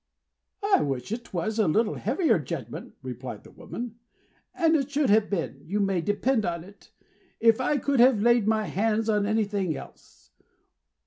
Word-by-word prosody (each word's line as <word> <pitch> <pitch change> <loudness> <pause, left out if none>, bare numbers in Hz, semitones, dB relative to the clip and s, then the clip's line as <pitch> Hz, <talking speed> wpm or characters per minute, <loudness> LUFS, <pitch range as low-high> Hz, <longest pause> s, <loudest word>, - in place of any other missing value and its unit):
"I 405 0 +4
wish 135 +1 -3
it 235 +1 -5
was 210 +5 -2
a 215 - +3
little 215 +7 +2
heavier 295 - +1
judgment," - - -6
replied - - -7
the - - -15
woman; 235 -1 -8 0.6
"and 330 -1 +3
it 275 -3 0
should 285 -4 +1
have 215 0 +4
been, 165 -8 -3
you 195 +7 -2
may 195 -3 +1
depend 215 +5 +1
upon 170 -3 -2
it, 200 +3 -17 0.5
if 230 +1 +4
I 285 +3 +1
could 280 -1 0
have 245 -2 +6
laid 235 0 +3
my 220 -1 +2
hands 220 +2 0
on 210 -1 +2
anything 205 -6 0
else. 60 0 -14
215 Hz, 170 wpm, -26 LUFS, 195-240 Hz, 0.6 s, have